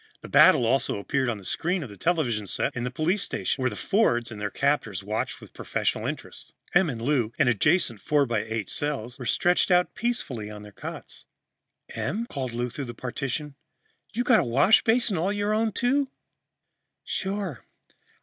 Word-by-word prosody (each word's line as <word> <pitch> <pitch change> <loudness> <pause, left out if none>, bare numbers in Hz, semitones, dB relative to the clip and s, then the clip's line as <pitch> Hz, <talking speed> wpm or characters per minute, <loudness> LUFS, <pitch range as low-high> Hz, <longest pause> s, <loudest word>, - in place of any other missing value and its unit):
The - - -10
battle 120 - +6
also 120 -1 +1
appeared 130 +5 0
on 115 - -2
the 100 - -13
screen 175 - -1
of 130 - -8
the - - -10
television 120 - 0
set - - -1
in 120 - -2
the - - -1
police 160 +10 0
station, 135 - -1
where 130 - +2
the - - -7
Fords 120 - +1
and 105 -2 -8
their 105 - -1
captors 115 -8 0
watched 105 +2 -3
with - - -14
professional - - -2
interest. - - -6 0.2
Em 175 -1 +4
and 120 -5 -4
Lou, 120 -2 +1
in 145 - +3
adjacent 125 - +2
four 145 -2 +2
by 120 -4 0
eight 110 -1 -3
cells, 135 -4 -3
were 125 - -5
stretched 180 +1 +2
out 180 0 +3
peacefully 170 - -2
on 105 -1 -9
their 105 - -11
cots. - - -9 0.6
"Em," 225 +3 -3
called 135 - -4
Lou 120 +1 -2
through 140 +3 -5
the 120 -1 -8
partition, 135 +4 -4 0.6
"you 245 - -1
got 235 -3 +5
a - - +2
washbasin 205 - +4
all 185 +5 +1
your 205 +1 0
own, 220 +1 +1
too?" 265 +5 +1 0.9
"Sure. 190 - -3
140 Hz, 185 wpm, -26 LUFS, 115-190 Hz, 0.9 s, battle